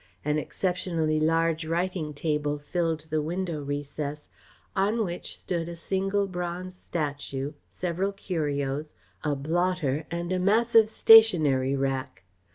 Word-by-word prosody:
An 150 0 +1
exceptionally 165 -2 -1
large 165 +1 +2
writing 170 -1 -1
table 150 0 -1
filled 165 +1 -1
the 155 -1 +1
window 170 0 -3
recess, 145 +1 -4 0.5
on 210 +3 +2
which 175 -1 -6
stood 170 -2 -3
a 170 - -6
single 195 +3 0
bronze 180 0 -5
statue, 145 -4 -4 0.2
several 185 +2 -2
curios, 150 -6 -3 0.3
a 150 -2 +1
blotter 160 -1 0
and 170 +2 -2
a 185 - +1
massive 220 +3 +4
stationery 155 -14 +6
rack. 135 -8 -2
165 Hz, 120 wpm, -27 LUFS, 150-185 Hz, 0.5 s, stationery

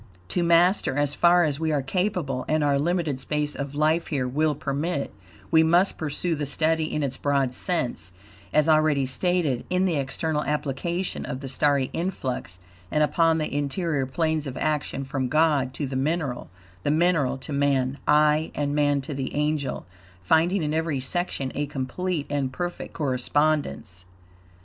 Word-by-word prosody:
To 180 - 0
master 170 -4 +3
as 145 -1 +1
far 175 +3 +5
as 150 -3 0
we 160 -1 0
are 145 -3 0
capable, 150 -4 -1
and 155 0 +1
our 140 -1 +2
limited 160 -3 0
space 150 +2 -1
of 140 0 -5
life 155 +3 +2
here 135 -5 -1
will 150 +4 +1
permit, 140 +2 -2 0.4
we 160 -1 +6
must 175 +4 +3
pursue 160 +3 -1
the 150 -2 -2
study 155 +2 0
in 150 - -1
its 130 -2 -2
broad 140 -3 +1
sense, 125 - -2 0.4
as 150 +1 +3
already 155 -3 +3
stated, 150 -1 0
in 180 +1 +2
the 170 -5 +1
external 150 +3 -1
application 150 +5 -2
of 130 - -5
the 135 - -5
starry 135 0 +1
influx 130 - -3 0.3
and 150 - +2
upon 165 +1 +3
the 155 -3 -2
interior 145 -1 -1
planes 155 +1 -1
of 130 - -6
action 150 -2 -1
from 135 -1 -2
God 150 -2 +2
to 145 - -2
the 130 0 -5
mineral, 140 -2 -1 0.3
the - - -1
mineral 155 -4 +2
to 140 +2 -7
man; 140 -1 +1
aye, 150 +1 +4
and 145 -1 -1
man 145 -1 +2
to 140 +2 -6
the 135 -1 -4
angel, 150 -1 -1 0.4
finding 165 - +3
in 150 0 -1
every 160 -3 0
section 135 -1 -2
a 145 +1 -2
complete 145 +4 -3
and 140 -2 -1
perfect 175 +7 -5
correspondence. 135 - -1
150 Hz, 165 wpm, -25 LUFS, 135-160 Hz, 0.4 s, we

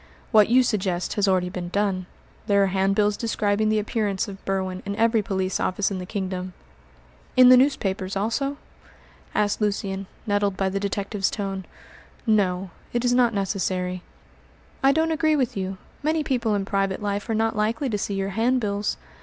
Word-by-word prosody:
"What 215 -3 +6
you 255 +2 +6
suggest 190 -6 -1
has 205 -1 +1
already 185 -2 +2
been 180 -1 -5
done. 190 -2 -1 0.4
There 200 -1 +4
are 190 -1 0
handbills 195 +2 +2
describing 215 -1 0
the 215 - +2
appearance 210 -2 -1
of 195 -1 -9
Berwin 190 -1 -2
in 200 0 -4
every 225 0 +3
police 190 -3 -1
office 195 +2 0
in 190 - -3
the 180 - -6
kingdom." 185 -2 -4 0.8
"In 255 -1 +9
the 255 - +10
newspapers, 200 -8 +1
also?" 255 +8 -1 0.8
asked 210 +1 +1
Lucian, 195 -2 -1 0.2
nettled 205 -2 0
by 195 -1 +1
the 195 +1 -2
detective's 200 0 -1
tone. 195 -2 -4 0.6
"No; 190 -4 +1 0.2
it 240 +1 0
is 245 - +3
not 245 -2 +4
necessary." 185 -2 -1 0.8
"I 270 - +5
don't 320 +3 +1
agree 310 0 +2
with 260 -5 0
you. 190 -1 -3 0.2
Many 310 +1 +1
people 235 -6 0
in 200 -1 -1
private 195 0 -1
life 205 +2 -2
are 225 - +1
not 225 +1 +1
likely 225 +7 0
to 215 -4 -1
see 200 - -2
your 195 0 -1
handbills. 215 -1 0
205 Hz, 170 wpm, -24 LUFS, 190-225 Hz, 0.8 s, the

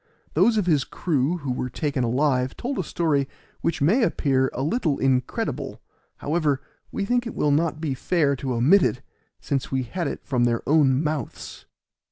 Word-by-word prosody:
Those 210 +8 +4
of 205 - +1
his 155 -6 +3
crew 155 +1 -1
who 140 -5 -4
were 125 0 -2
taken 140 0 -2
alive 130 +1 +1
told 260 +3 -3
a - - 0
story 150 -4 0 0.3
which 165 - 0
may 205 - +4
appear 135 - +2
a 130 - -3
little 155 - 0
incredible; 130 -2 -1 0.4
however, 150 -3 0 0.3
we 200 - -2
think 245 +2 0
it - - -7
will 150 - +1
not 155 +1 +1
be 155 -4 -2
fair 140 +1 +1
to 130 -1 -3
omit 150 +13 +5
it 130 -4 0 0.4
since 140 -2 -2
we 130 -1 0
had 170 +6 -3
it - - -6
from 125 -4 +1
their 120 -1 -1
own 145 -2 +4
mouths. 150 -5 -5
145 Hz, 180 wpm, -24 LUFS, 130-170 Hz, 0.4 s, omit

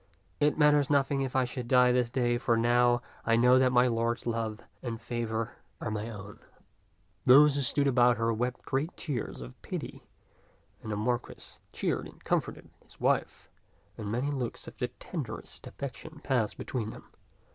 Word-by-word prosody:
It 150 0 +2
matters 150 -2 +4
nothing 140 -1 +2
if 130 -1 -3
I 130 -1 +3
should 125 -1 -5
die 125 0 +5
this 125 -1 +2
day, 120 -1 +1
for 120 -2 +2
now 120 +1 +3 0.2
I 115 - +3
know 125 +2 +6
that 130 -1 +4
my 125 0 +5
lord's 115 0 0
love 115 -2 -2 0.2
and 115 -3 -4
favor 115 0 -3 0.2
are 110 - -3
my 105 +1 -3
own." 105 -1 -9 0.9
Those 145 +3 +8
who 140 - 0
stood 140 +2 +1
about 125 -2 +4
her 115 0 +1
wept 125 +3 -3
great 140 +6 -2
tears 130 - -4
of - - -12
pity, - - -6 0.8
and 110 - -6
the - - -1
Marquis 120 +3 -3
cheered - - -2
and - - -17
comforted - - -2
his - - -21
wife, - - 0 0.5
and 105 -1 -5
many 125 +5 -1
looks 130 -4 -4
of - - -9 0.2
tenderest - - -6
affection 140 +3 -8
passed 125 -6 0
between 115 -5 -3
them. - - -11
120 Hz, 170 wpm, -30 LUFS, 115-130 Hz, 0.9 s, Those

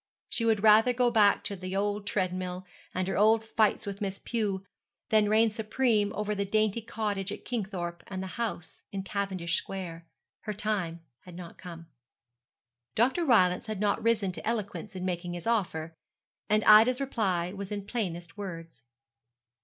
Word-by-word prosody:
She 230 - -1
would 220 -2 +2
rather 220 +3 +6
go 245 0 +2
back 210 -3 +4
to 200 - -3
the 185 0 -5
old 205 +1 -1
treadmill, 185 -1 -2 0.3
and 185 0 -2
her 195 - -1
old 220 +2 +4
fights 220 -1 +1
with 200 +1 -6
Miss 195 -1 -2
Pew, 200 -5 -2 0.4
than 215 -1 +4
reign 220 +1 +4
supreme 215 -1 +1
over 210 0 -1
the 200 -1 -1
dainty 215 +2 +1
cottage 205 -3 -3
at - - -7
Kingthorpe 185 -7 -3
and 190 -1 -4
the 190 +5 -6
house 175 -8 -4
in 195 -1 -4
Cavendish 190 -4 -2
Square. 170 -3 -6 0.3
Her 210 - -5
time 190 -6 -2 0.2
had 180 -2 -13
not 175 -1 -10
come. 170 -2 -9 1.1
Dr. 260 +10 +2
Rylance 185 - +4
had 215 -3 -4
not 205 -1 +1
risen 215 -4 +2
to 180 - -7
eloquence 215 -2 -3
in 185 0 -4
making 175 -1 -3
his 175 -1 -6
offer; 175 -8 -1 0.6
and 215 0 +3
Ida's 225 +4 +7
reply 195 -10 -1
was 200 -1 -6
in 205 -1 -4
plainest 175 -7 -4
words. 165 - -7
200 Hz, 165 wpm, -29 LUFS, 185-220 Hz, 1.1 s, Ida's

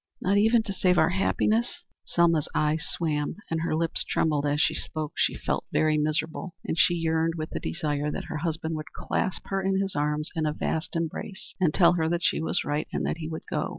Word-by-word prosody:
"Not 200 +2 +2
even 225 +2 +4
to 200 - -4
save 180 -1 +2
our 160 0 +4
happiness?" 215 +4 +1 0.2
Selma's 165 -3 +3
eyes 155 +1 +1
swam 150 -3 -1 0.2
and 165 0 0
her 165 - 0
lips 165 0 0
trembled 150 -2 +1
as 145 0 +1
she 160 - +3
spoke. 155 -2 -4
She - - +2
felt - - -2
very 155 0 +3
miserable, 155 +3 -1
and - - -1
she 175 +1 +4
yearned 165 0 +1
with 155 0 -4
the - - -3
desire 150 -3 -2
that - - -3
her 155 - -5
husband 160 0 -2
would 155 - -8
clasp 185 - -2
her 195 0 0
in 190 0 +1
his 195 -3 -2
arms 150 +1 0
in 160 -1 0
a 150 - 0
vast 160 +3 -2
embrace, 165 +4 -4
and 175 -5 +3
tell 175 0 +5
her 160 -2 +1
that 175 +1 -1
she - - +2
was 160 - 0
right 145 +1 -1
and - - -1
that - - -1
he 160 -1 -5
would 160 - -5
go. - - -1
160 Hz, 220 wpm, -27 LUFS, 155-180 Hz, 0.2 s, tell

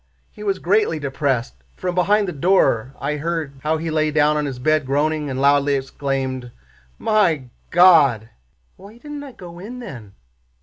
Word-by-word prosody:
He 210 - -14
was 195 -2 0
greatly 195 -2 +1
depressed. 135 -3 -2
From 180 -1 -3
behind 200 +3 +2
the - - -2
door 135 - +2
I 150 +2 -2
heard 155 -3 -3
how 155 +1 0
he 160 0 -4
lay 155 0 +1
down 150 0 +3
on 150 -1 -1
his 135 -3 -5
bed 155 +4 +1
groaning 150 +2 0
and 130 -1 -3
loudly 140 0 +3
exclaimed, 135 -2 -3 0.5
'My 170 - +1 0.2
God!' 150 - +5 0.5
Why 205 +4 -14
didn't 295 +3 -8
I 275 -3 -10
go 175 -4 -11
in 225 +7 -8
then? 120 - -9
155 Hz, 165 wpm, -21 LUFS, 135-180 Hz, 0.5 s, God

